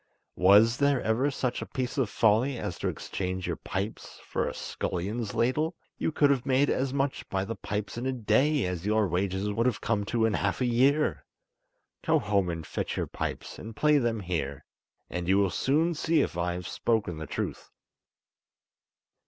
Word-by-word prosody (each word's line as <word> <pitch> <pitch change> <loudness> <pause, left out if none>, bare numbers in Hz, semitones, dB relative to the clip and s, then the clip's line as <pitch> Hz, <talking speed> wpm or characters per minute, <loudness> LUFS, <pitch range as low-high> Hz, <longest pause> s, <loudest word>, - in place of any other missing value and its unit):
Was 105 +6 +6
there 140 -1 +3
ever 115 +6 +2
such 130 -3 -2
a - - -5
piece 130 +1 -3
of 125 -6 +1
folly 115 +5 +3
as - - -4
to - - -1
exchange 95 -1 -3
your - - -1
pipes 100 +3 -5
for - - -1
a - - -3
scullion's 105 +5 -3
ladle? 150 +8 +1 0.2
You - - 0
could 145 -2 +4
have 130 -3 +1
made 135 +1 +3
as 130 0 0
much 140 0 -2
by 95 0 -1
the 115 +3 -4
pipes 105 +2 -4
in 125 - -2
a - - +1
day 130 +4 +2
as 90 -2 -3
your 110 -1 +3
wages 95 +3 -1
would 115 +4 +1
have 120 -5 0
come 105 -2 0
to 115 +1 +1
in 110 - +1
half 100 -1 0
a 130 - +1
year. 130 - +2 0.8
Go - - +3
home 100 -3 +1
and 80 -2 -4
fetch - - -3
your - - 0
pipes, - - -5
and 110 0 -8
play 150 +2 +4
them 115 -4 0
here, 75 -7 -3 0.4
and 90 -1 -4
you 95 +1 +4
will 100 -2 +3
soon 160 +5 +2
see 160 0 +2
if 85 - -2
I 85 0 0
have 90 -1 -5
spoken 110 -8 0
the 80 - -6
truth." - - -4
110 Hz, 190 wpm, -28 LUFS, 95-130 Hz, 0.8 s, Was